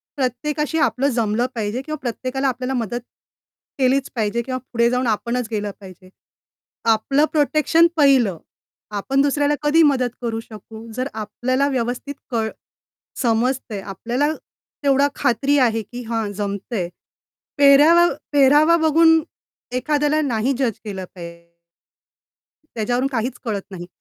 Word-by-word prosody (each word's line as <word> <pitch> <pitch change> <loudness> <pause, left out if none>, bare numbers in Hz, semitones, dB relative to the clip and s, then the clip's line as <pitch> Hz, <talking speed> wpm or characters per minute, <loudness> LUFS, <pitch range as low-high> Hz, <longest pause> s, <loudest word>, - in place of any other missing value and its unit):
प्रत्येकाशी 295 +4 -2
आपलं 275 -2 +1
जमलं 230 -2 0
पाहिजे 220 +2 -2
किंवा 310 +3 -5
प्रत्येकाला 255 +2 -2
आपल्याला 255 0 -2
मदत 240 -1 -2 0.8
केलीच 265 +1 +2
पाहिजे 225 0 0
किंवा 255 +2 -4 0.2
पुढे 235 0 +3
जाऊन 250 0 0
आपणच 235 +2 -1
गेलं 210 -2 -2
पाहिजे. 185 -1 -14 0.8
आपलं 230 +6 +3
प्रोटेक्शन 305 +3 +3
पाहिलं. 265 - +4 0.6
आपण 270 +7 +1
दुसऱ्याला 290 +1 +2
कधी 300 +2 +4
मदत 265 -4 +2
करू 230 -2 -2
शकू 220 0 -12
जर 255 +3 -2
आपल्याला 245 +6 -1
व्यवस्थित 250 +2 -3 0.2
कळ 225 -2 0 0.7
समजतंय. 235 -2 0
आपल्याला 240 +9 -2 0.5
तेवढी 280 0 +4
खात्री 270 +5 +1
आहे, 225 -3 +2
की 240 +4 -9
हा 225 -1 -2
जमतंय. 200 -1 -3 0.7
पेहरावा 295 +5 +6 0.2
पेहरावा 295 +4 +5
बघून 325 +1 +5 0.5
एखाद्याला 295 +3 +1
नाही 255 -2 0
जज 250 -6 -1
केलं 195 -3 -5
पा 180 - -10 1.5
त्याज्यावरून 245 +4 0
काहीच 245 +1 -2
कळत 210 -4 -2
नाही. 175 -2 -8
250 Hz, 120 wpm, -21 LUFS, 225-280 Hz, 1.5 s, पेहरावा